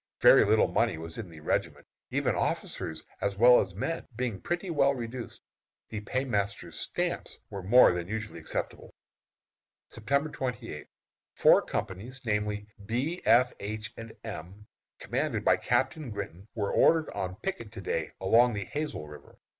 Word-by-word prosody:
Very -, -, +8 dB
little -, -, +4 dB
money -, -, +1 dB
was 80 Hz, +4 st, -6 dB
in 100 Hz, -5 st, -6 dB
the 80 Hz, -2 st, -12 dB
regiment, -, -, -1 dB, 0.2 s
even -, -, +1 dB
officers 80 Hz, -, -2 dB, 0.2 s
as 100 Hz, -1 st, -1 dB
well 125 Hz, +3 st, +8 dB
as 95 Hz, -2 st, -2 dB
men 165 Hz, +11 st, -3 dB
being 120 Hz, -4 st, -2 dB
pretty 175 Hz, +1 st, -2 dB
well 140 Hz, -3 st, +3 dB
reduced. 120 Hz, 0 st, -6 dB, 0.5 s
The 105 Hz, -2 st, -4 dB
paymaster's 105 Hz, -4 st, -2 dB
"stamps" -, -, -2 dB
were 100 Hz, -, -5 dB
more 110 Hz, +3 st, +7 dB
than 90 Hz, 0 st, -3 dB
usually 110 Hz, -4 st, -4 dB
acceptable. 80 Hz, -, -5 dB, 0.9 s
September 140 Hz, +7 st, 0 dB
28. 125 Hz, -2 st, -5 dB, 0.5 s
Four -, -, +6 dB
companies, 105 Hz, +6 st, -4 dB
namely, 105 Hz, -1 st, -1 dB, 0.2 s
B, 130 Hz, -, -2 dB
F, 125 Hz, +2 st, +5 dB
H, 105 Hz, +2 st, -5 dB
and 115 Hz, 0 st, -9 dB
M, 100 Hz, -1 st, -8 dB, 0.3 s
commanded -, -, -2 dB
by -, -, +5 dB
Captain 135 Hz, +1 st, 0 dB
Grinton, 100 Hz, -2 st, -6 dB
were 100 Hz, -3 st, -1 dB
ordered 160 Hz, -1 st, +4 dB
on 95 Hz, 0 st, -3 dB
picket 115 Hz, -, -5 dB
to 100 Hz, -, -7 dB
day 80 Hz, -3 st, -2 dB
along 115 Hz, +5 st, +5 dB
the 100 Hz, -, -3 dB
Hazel 150 Hz, -, -4 dB
River. 75 Hz, 0 st, -13 dB
110 Hz, 150 wpm, -29 LUFS, 100-125 Hz, 0.9 s, Very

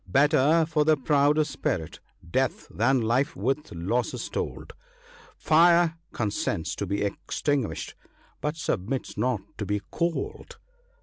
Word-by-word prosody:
Better 150 Hz, -, +4 dB
for 155 Hz, -2 st, +2 dB
the 155 Hz, 0 st, +4 dB
proud 145 Hz, +2 st, +3 dB
of 155 Hz, -, +3 dB
spirit, 80 Hz, -, -3 dB, 0.3 s
death, -, -, -1 dB
than 125 Hz, +4 st, +2 dB
life 130 Hz, +8 st, +1 dB
with 135 Hz, +7 st, -2 dB
losses 100 Hz, +9 st, -2 dB
told; -, -, -4 dB, 0.6 s
Fire 170 Hz, +1 st, +4 dB
consents 105 Hz, -6 st, -2 dB
to -, -, -3 dB
be 100 Hz, +1 st, -1 dB
extinguished, 130 Hz, +5 st, -2 dB, 0.5 s
but 150 Hz, +1 st, -1 dB
submits 125 Hz, -, -2 dB
not 125 Hz, -5 st, 0 dB, 0.2 s
to 105 Hz, -, -2 dB
be 105 Hz, 0 st, 0 dB
cold." 170 Hz, -1 st, -3 dB
135 Hz, 125 wpm, -26 LUFS, 110-155 Hz, 0.6 s, Better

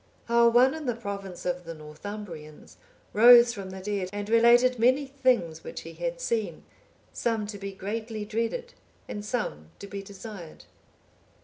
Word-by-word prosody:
How 235 Hz, 0 st, +5 dB
one 245 Hz, +3 st, +5 dB
in 315 Hz, -3 st, -6 dB
the 245 Hz, -, 0 dB
province 200 Hz, -5 st, -7 dB
of 180 Hz, 0 st, -2 dB
the 165 Hz, -1 st, -7 dB
Northumbrians, 155 Hz, 0 st, -9 dB, 0.4 s
rose 235 Hz, +2 st, +8 dB
from 195 Hz, -4 st, -7 dB
the 190 Hz, 0 st, -8 dB
dead, 195 Hz, -2 st, -2 dB
and 205 Hz, 0 st, -5 dB
related 240 Hz, +2 st, +5 dB
many 260 Hz, +5 st, +3 dB
things 255 Hz, -, 0 dB
which -, -, -7 dB
he -, -, -10 dB
had -, -, -4 dB
seen, 230 Hz, -, -2 dB, 0.5 s
some 225 Hz, -3 st, -1 dB
to 205 Hz, -1 st, -7 dB
be 195 Hz, 0 st, -5 dB
greatly 215 Hz, +2 st, -5 dB
dreaded 230 Hz, -, -3 dB, 0.3 s
and 205 Hz, -, -6 dB
some 210 Hz, -, -3 dB
to -, -, -9 dB
be 200 Hz, 0 st, -6 dB
desired. 195 Hz, -3 st, -10 dB
210 Hz, 155 wpm, -27 LUFS, 195-240 Hz, 0.5 s, rose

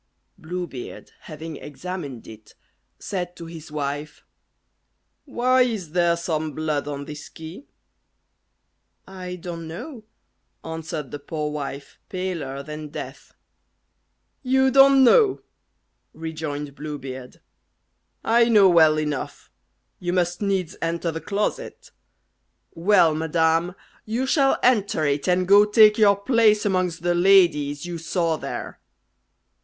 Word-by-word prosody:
Blue 180 Hz, +2 st, -5 dB
Beard 135 Hz, -7 st, -9 dB
having 155 Hz, 0 st, -8 dB
examined 150 Hz, -4 st, -7 dB
it, 110 Hz, -1 st, -14 dB, 0.4 s
said 180 Hz, -2 st, -5 dB
to 170 Hz, -, -9 dB
his 165 Hz, -2 st, -10 dB
wife, 145 Hz, 0 st, -5 dB, 1.0 s
"Why 255 Hz, -2 st, +2 dB
is 220 Hz, -10 st, -1 dB
there 170 Hz, 0 st, +2 dB
some 160 Hz, -3 st, -3 dB
blood 150 Hz, -1 st, -2 dB
on 140 Hz, -1 st, -5 dB
this 150 Hz, 0 st, -9 dB
key?" 160 Hz, -, -11 dB, 1.4 s
"I 185 Hz, -1 st, -7 dB
don't 170 Hz, -2 st, -7 dB
know," 220 Hz, -, -8 dB, 0.6 s
answered 160 Hz, -3 st, -6 dB
the 145 Hz, -, -6 dB
poor 150 Hz, +1 st, -4 dB
wife, 140 Hz, -1 st, -7 dB
paler 170 Hz, -8 st, -4 dB
than 150 Hz, +1 st, -7 dB
death. 150 Hz, -, -9 dB, 1.1 s
"You 265 Hz, 0 st, +2 dB
don't 270 Hz, 0 st, +7 dB
know?" 405 Hz, -, +5 dB, 0.7 s
rejoined 155 Hz, -3 st, -5 dB
Blue 150 Hz, +1 st, -6 dB
Beard. 130 Hz, -2 st, -9 dB, 0.8 s
"I 235 Hz, +1 st, +4 dB
know 210 Hz, -4 st, +6 dB
well 160 Hz, -3 st, +5 dB
enough. 150 Hz, -2 st, -5 dB, 0.5 s
You 175 Hz, 0 st, -2 dB
must 175 Hz, 0 st, 0 dB
needs 190 Hz, -4 st, -1 dB
enter 165 Hz, 0 st, -1 dB
the 160 Hz, 0 st, -6 dB
closet. 205 Hz, +1 st, -4 dB, 0.8 s
Well, 170 Hz, -2 st, +4 dB
madam, 160 Hz, +2 st, +1 dB, 0.3 s
you 230 Hz, +4 st, -2 dB
shall 270 Hz, 0 st, +3 dB
enter 205 Hz, -10 st, +2 dB
it, 140 Hz, -1 st, -1 dB
and 180 Hz, 0 st, +2 dB
go 200 Hz, +2 st, +7 dB
take 210 Hz, +1 st, +5 dB
your 205 Hz, -2 st, +6 dB
place 215 Hz, 0 st, +3 dB
amongst 185 Hz, -4 st, -1 dB
the 175 Hz, 0 st, +2 dB
ladies 175 Hz, -6 st, +3 dB
you 175 Hz, -1 st, -5 dB
saw 165 Hz, 0 st, -1 dB
there." -, -, -6 dB
170 Hz, 120 wpm, -23 LUFS, 150-200 Hz, 1.4 s, don't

